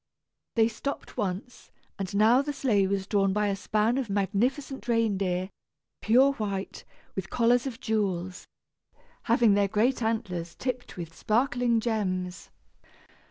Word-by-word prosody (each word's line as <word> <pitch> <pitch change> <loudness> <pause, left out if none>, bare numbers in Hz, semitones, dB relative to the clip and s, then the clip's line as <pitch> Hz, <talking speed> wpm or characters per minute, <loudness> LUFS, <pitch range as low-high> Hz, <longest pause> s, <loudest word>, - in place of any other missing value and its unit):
They 225 -2 +5
stopped 255 +5 -5
once, 200 +5 -4 0.3
and 195 0 -4
now 225 +5 +5
the 290 +1 -3
sleigh 215 -8 +2
was 195 0 -1
drawn 195 -1 +2
by 210 0 +1
a 200 - 0
span 215 +5 +1
of 250 -5 -3
magnificent 240 +8 -1
reindeer, 195 -5 0 0.5
pure 255 +5 +5
white, 200 -5 -4 0.3
with 190 -1 -4
collars 245 +2 +2
of 245 -3 -6
jewels, 190 -7 -2 0.8
having 230 -2 +4
their 200 0 +3
great 225 +6 +1
antlers 185 -7 -2
tipped 250 -4 -4
with 165 -2 -7
sparkling 240 0 +1
gems. 190 -5 -2
215 Hz, 130 wpm, -27 LUFS, 195-240 Hz, 0.8 s, They